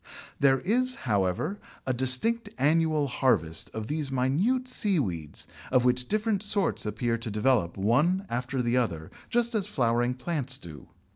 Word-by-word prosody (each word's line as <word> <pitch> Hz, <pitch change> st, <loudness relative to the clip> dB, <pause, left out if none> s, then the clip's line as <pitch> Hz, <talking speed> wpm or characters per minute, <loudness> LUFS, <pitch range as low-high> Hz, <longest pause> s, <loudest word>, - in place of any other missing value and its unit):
There 135 Hz, -1 st, +4 dB
is, 255 Hz, +6 st, +1 dB
however, 105 Hz, -, 0 dB, 0.3 s
a 130 Hz, -, 0 dB
distinct 130 Hz, -, +1 dB
annual 155 Hz, +2 st, +2 dB
harvest 85 Hz, -, +1 dB
of 110 Hz, -1 st, -5 dB
these 150 Hz, +1 st, -3 dB
minute 170 Hz, -, +1 dB
seaweeds, 130 Hz, -, -1 dB, 0.3 s
of 130 Hz, -1 st, +3 dB
which 125 Hz, 0 st, +2 dB
different 215 Hz, -2 st, 0 dB
sorts 205 Hz, -, 0 dB
appear 115 Hz, +2 st, -1 dB
to 115 Hz, 0 st, -5 dB
develop 105 Hz, -5 st, +1 dB
one 150 Hz, -, +2 dB
after 125 Hz, +2 st, -2 dB
the 120 Hz, +1 st, +1 dB
other, 85 Hz, -10 st, -1 dB, 0.2 s
just 235 Hz, 0 st, +1 dB
as 205 Hz, -3 st, 0 dB
flowering 120 Hz, -, +1 dB
plants 135 Hz, -2 st, -2 dB
do. 80 Hz, -, -11 dB
130 Hz, 145 wpm, -28 LUFS, 115-185 Hz, 0.3 s, There